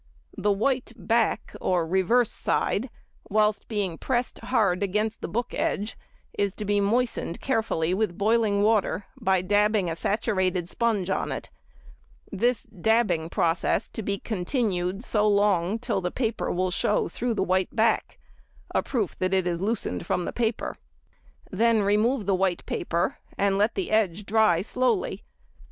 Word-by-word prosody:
The 210 - +1
white 245 +4 0
back 225 +3 0
or 180 -3 +1
reverse 190 +7 +2
side, 245 +6 -1 0.4
whilst 210 0 +1
being 200 -7 -2
pressed 245 -2 -1
hard 205 -8 +1
against 210 +3 -1
the - - -3
book 235 +7 -3
edge, 290 -9 -1 0.4
is 200 -2 0
to 210 - -5
be 205 0 +2
moistened 225 -4 0
carefully 215 -10 0
with 195 -3 -1
boiling 210 -1 +2
water, 210 -2 +2
by 190 -1 +1
dabbing 205 -1 +2
a - - -3
saturated 185 -2 0
sponge 205 -3 0
on - - -1
it; - - -6 0.8
this 235 +5 +1
dabbing 220 -6 +1
process 170 0 +1
to - - -6
be 200 -1 -2
continued 195 -2 -2
so 210 -4 +1
long 200 -1 +2
till 230 -4 -2
the 180 - -1
colour 225 +1 -2
will 185 +1 0
show 205 +3 +1
through 240 -1 -2
the 190 - +1
white 185 0 0
back—a 225 0 -2
proof 225 -8 -2
that 185 +1 +1
it 190 -1 +1
is 175 -1 -1
loosened 195 - -2
from 180 - 0
the - - -4
paper. 230 -1 -2 0.7
Then 230 -2 +3
remove 210 +4 +2
the 195 - +2
white 185 -2 0
paper, 170 0 -1 0.2
and 200 -1 +2
let 215 +3 +2
the 190 - -2
edge 210 -3 +1
dry 210 -5 +3
slowly. 230 -5 0
205 Hz, 150 wpm, -26 LUFS, 185-225 Hz, 0.8 s, Then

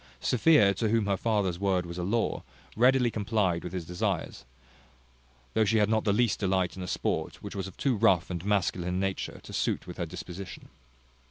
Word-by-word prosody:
Sophia, 115 - +4
to 110 +3 -1
whom 115 -1 +2
her 100 -1 +1
father's 100 -5 0
word 95 -3 +1
was 85 +1 -6
a - - -2
law, 115 +5 0 0.3
readily 125 +1 +4
complied 100 -5 0
with 90 - -5
his 90 -3 -4
desires, 90 -7 -3 1.1
though 110 - +3
she 110 +2 +2
had 105 -1 +3
not 110 0 +1
the 105 - +3
least 115 +1 +2
delight 95 -3 0
in 95 - -7
a 90 - -5
sport, - - -2
which - - -7
was 95 -1 -3
of 95 - -12
too 135 -4 +1
rough 95 -3 +3
and 85 -1 -4
masculine 90 -3 0
a - - 0
nature 95 0 -2
to - - -10
suit - - -1
with - - -9
her - - -2
disposition. 90 +1 -8
100 Hz, 200 wpm, -28 LUFS, 90-110 Hz, 1.1 s, Sophia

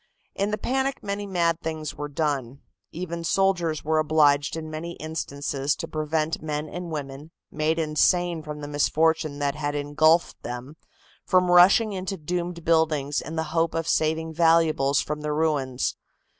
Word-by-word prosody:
In 200 +1 -1
the 210 - -1
panic 265 +3 -1
many 200 0 -3
mad 170 -3 0
things 155 -2 -4
were 145 0 -5
done. 140 -3 -2 0.3
Even 170 0 -5
soldiers 175 -4 +1
were 155 0 +2
obliged 150 -1 +3
in 160 -1 -5
many 165 +2 -5
instances 145 -3 -3
to 165 - -6
prevent 155 +1 -1
men 150 0 -3
and 175 +2 -6
women, 145 -1 -6 0.2
made 155 +1 0
insane 165 +2 +2
from 150 -1 -7
the 145 - -5
misfortune 155 +1 +1
that 145 -1 0
had 145 0 -3
engulfed 155 +3 +2
them, 125 +4 -7 0.5
from 180 -1 +3
rushing 195 +5 +6
into 190 +1 -4
doomed 170 +1 -4
buildings 155 -3 +2
in 160 - -7
the 160 - 0
hope 165 -1 +1
of 165 0 -2
saving 160 0 0
valuables 160 -5 +3
from 150 0 -4
the 150 0 -2
ruins. 145 -5 0
160 Hz, 155 wpm, -25 LUFS, 150-170 Hz, 0.5 s, rushing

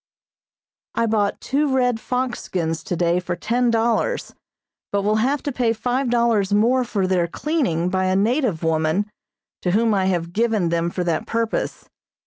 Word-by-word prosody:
I 230 - +2
bought 210 -2 0
two 285 +1 0
red 250 -3 +2
fox 250 +1 -2
skins 165 -3 -2
today 175 0 +1
for 180 -1 -3
ten 235 +7 0
dollars, 230 0 0 0.6
but 200 0 0
will 210 +1 +2
have 265 +6 +1
to 285 - -2
pay 240 -3 +1
five 245 +4 -1
dollars 235 -4 +2
more 235 +5 +3
for 210 -5 -1
their 185 -2 +1
cleaning 210 - -1
by 185 +1 0
a 185 0 +1
native 215 - +1
woman, 160 +6 +1 0.5
to 180 - -1
whom 225 +1 +3
I 190 -2 +1
have 175 -2 -1
given 220 -5 +1
them 170 0 0
for 180 +1 -3
that 175 +6 -1
purpose. 230 0 -2
215 Hz, 165 wpm, -22 LUFS, 180-240 Hz, 0.6 s, more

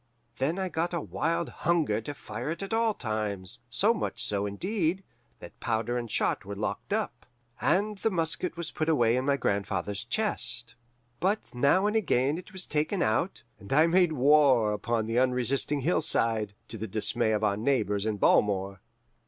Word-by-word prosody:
Then 150 +7 0
I 190 -1 -1
got 170 +1 -2
a - - 0
wild 165 +2 -2
hunger 155 -11 0
to 145 +6 -6
fire 115 +3 -6
it 170 +4 -3
at 195 - -5
all 225 -1 +2
times; 105 -2 -3
so 205 - +3
much 230 - -3
so, 100 0 -1
indeed, 185 - -1 0.3
that - - -13
powder 115 +1 -1
and 120 -1 -3
shot - - 0
were 100 +1 -6
locked 105 - -4
up, - - -2 0.3
and 205 +2 +1
the 225 - +1
musket 175 -1 -1
was 170 -2 -4
put 155 +1 -2
away 120 -7 +3
in 130 +1 -1
my 140 0 +2
grandfather's 100 -2 -1
chest. 120 - 0 0.5
But 195 +5 -1
now 140 +10 +3
and 210 +1 +1
again 150 - +1
it 185 - -13
was 185 -2 -4
taken 155 +6 0
out, 110 0 0 0.2
and 100 - -12
I 155 +4 +5
made 175 -1 +3
war 135 -6 +4
upon 115 +1 -1
the 115 +2 0
unresisting 130 +3 +1
hillside, 115 - +1
to 115 - -7
the 110 - -4
dismay 110 +3 +1
of 110 0 0
our 100 -2 +2
neighbours 105 -3 0
in 110 -1 -1
Balmore. 95 -2 +2
130 Hz, 175 wpm, -28 LUFS, 110-170 Hz, 0.5 s, I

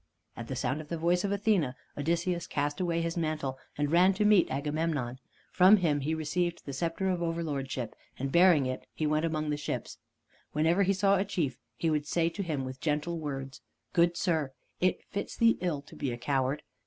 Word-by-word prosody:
At 115 - -7
the 135 - -4
sound 130 +4 -1
of 155 - -12
the 170 - -2
voice 175 +2 +2
of 200 - 0
Athene, 200 - +1 0.2
Odysseus 170 +3 -1
cast 145 +1 -1
away 170 -2 0
his 165 0 -2
mantle 155 -5 -2 0.2
and 145 0 0
ran 185 +3 +5
to 210 +2 +1
meet 210 -4 +5
Agamemnon. 145 -3 -2 0.3
From 190 +3 +7
him 160 -6 +1
he 155 +3 -1
received 170 +2 -2
the 140 - -5
scepter 165 +6 -1
of 180 -2 0
overlordship, 145 -7 -2 0.2
and 135 +1 -3
bearing 170 -4 +6
it 130 0 -4
he 155 - -1
went 155 +1 +2
among 155 -2 -1
the 145 - -1
ships. 145 - -4 0.5
Whenever 160 +5 +3
he 195 0 +3
saw 195 +1 +3
a 190 - +2
chief, 170 -11 -2 0.2
he 160 +6 0
would 150 -1 0
say 165 +1 +2
to 200 - -5
him 155 -8 -2
with 130 0 -7
gentle 160 +2 -1
words: 135 -3 -5 0.3
"Good 170 0 +3
sir, 155 -6 0 0.3
it 185 +1 +1
fits 200 - -4
thee 230 0 +4
ill 160 -6 -1
to - - -14
be 140 -4 -2
a 120 - -4
coward. 135 +2 0
160 Hz, 205 wpm, -30 LUFS, 145-175 Hz, 0.5 s, From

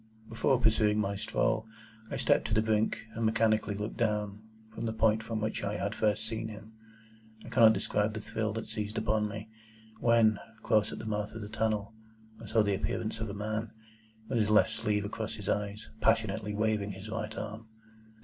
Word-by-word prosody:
Before 115 +3 +2
pursuing 110 -3 +3
my 100 -1 0
stroll, 65 - 0 0.4
I - - -3
stepped - - +3
to - - 0
the 110 - +4
brink, 110 0 +1
and 115 - -3
mechanically 110 -2 +2
looked 105 +2 -4
down, 105 -2 0 0.3
from 115 - -3
the 110 - -1
point 110 0 +3
from 115 0 -3
which 110 0 -2
I 100 +1 -1
had 100 +2 -2
first 110 0 +1
seen 110 0 -3
him. 110 0 -10 0.7
I - - -8
cannot 115 -3 +7
describe 105 0 0
the - - -2
thrill 110 0 -2
that 110 0 -4
seized 105 -1 -4
upon 110 -1 +1
me, 105 +1 -6 0.5
when, 115 -3 +4 0.2
close 110 -1 +3
at - - -6
the - - -7
mouth 105 -1 -2
of 110 - -6
the 105 - -6
tunnel, 110 -1 -1 0.5
I - - -8
saw 110 -2 +3
the 100 -1 +1
appearance 110 +3 -2
of 110 -1 -3
a 100 - -5
man, 110 +1 -3 0.5
with 120 - 0
his 105 -1 +2
left 105 +1 +5
sleeve 105 -2 0
across 110 +1 -4
his 105 -2 -8
eyes, 105 +1 -2
passionately 105 -2 +1
waving 105 -2 0
his 95 +3 -9
right 110 0 -4
arm. 110 +1 -6
110 Hz, 195 wpm, -31 LUFS, 105-110 Hz, 0.7 s, cannot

